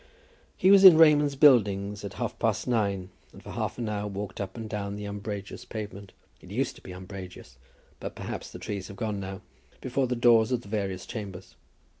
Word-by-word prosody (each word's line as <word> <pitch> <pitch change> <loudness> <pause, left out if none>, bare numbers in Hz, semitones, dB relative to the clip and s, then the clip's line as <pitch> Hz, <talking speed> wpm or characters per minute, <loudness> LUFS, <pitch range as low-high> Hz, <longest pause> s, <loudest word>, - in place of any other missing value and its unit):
He 190 - +5
was 200 -1 +7
in 185 -4 +11
Raymond's 150 -3 +5
Buildings 105 -8 +4
at 100 -1 -6
half 120 - -4
past 110 0 0
nine, 100 -6 0 0.2
and - - -15
for - - -9
half - - -3
an 120 -2 -3
hour 105 -1 -2
walked 100 +1 -5
up 95 +2 -6
and 110 -1 -5
down 100 -2 -4
the 105 0 -6
umbrageous 100 0 -6
pavement, 100 -3 -7 0.3
it - - -14
used - - -2
to - - -16
be - - -10
umbrageous, 95 0 -10 0.4
but - - -6
perhaps - - -6
the - - -9
trees 100 -2 -5
have 100 -1 -11
gone 110 -3 -2
now, 95 0 -6 0.4
before 130 +1 -1
the 125 - -1
doors 115 -1 +4
of 125 -2 0
the 100 - -14
various 100 -3 -3
chambers. 100 -4 -8
105 Hz, 200 wpm, -27 LUFS, 100-120 Hz, 0.4 s, in